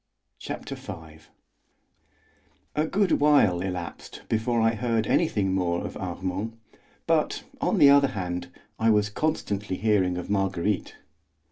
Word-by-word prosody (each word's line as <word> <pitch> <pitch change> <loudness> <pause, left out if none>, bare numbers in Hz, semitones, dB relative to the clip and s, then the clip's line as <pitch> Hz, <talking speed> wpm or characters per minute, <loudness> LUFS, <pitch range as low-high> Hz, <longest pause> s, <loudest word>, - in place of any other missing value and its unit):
Chapter - - -6
V 80 -1 -9 1.6
A 155 +1 +1
good 200 +2 +1
while 140 -12 +4
elapsed 90 -3 -6
before 115 +2 0
I 115 0 +3
heard 115 -1 0
anything 105 - +1
more 90 -2 0
of - - -6
Armand, 95 +4 -4 0.5
but, - - +1 0.2
on - - +1
the 140 -1 +8
other 140 0 +6
hand, 90 -8 -4 0.3
I 115 - +3
was 105 -1 +3
constantly 105 -9 -2
hearing 95 -5 +2
of 90 - -5
Marguerite. 95 -1 -1
105 Hz, 125 wpm, -26 LUFS, 90-115 Hz, 1.6 s, the